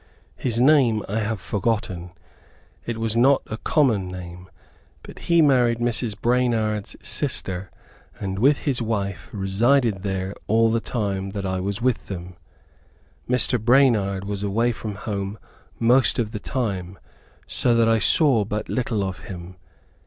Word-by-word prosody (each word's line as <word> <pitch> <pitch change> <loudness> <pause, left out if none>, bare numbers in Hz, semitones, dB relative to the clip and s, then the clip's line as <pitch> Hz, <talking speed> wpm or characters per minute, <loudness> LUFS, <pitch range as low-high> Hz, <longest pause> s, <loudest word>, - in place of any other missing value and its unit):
His 120 -3 -2
name 125 -6 +4
I 105 +3 -1
have 110 -1 -2
forgotten; 95 -2 -2 0.8
it 115 -1 -2
was 115 -1 -1
not 130 +4 +4
a 110 - -6
common 115 - +1
name, 90 0 -9 0.5
but - - -11
he 170 -1 +5
married 125 -5 +3
Mrs. 120 -2 -1
Branard's 115 -4 0
sister, 95 0 -1 0.5
and 95 0 -3
with 140 +5 +3
his 130 -4 0
wife 100 -6 -3
resided 105 +2 +1
there 95 0 -3
all 115 +1 +3
the 115 - +2
time 100 -5 -3
that 100 - -3
I 95 0 -1
was 100 +4 -3
with 130 -2 0
them. 90 -2 -7 0.9
Mr. 125 -1 +2
Branard 110 -7 +3
was 100 0 -4
away 110 +4 +1
from 110 -2 -6
home 100 0 -4 0.4
most 125 +3 +3
of 110 -3 -1
the 105 - -5
time, 100 -7 -3 0.5
so 120 -2 +1
that 115 -1 +4
I 115 0 +3
saw 135 -4 +4
but 105 +1 -4
little 115 -5 -1
of 95 -1 -4
him. 90 -1 -9
110 Hz, 145 wpm, -23 LUFS, 95-120 Hz, 0.9 s, he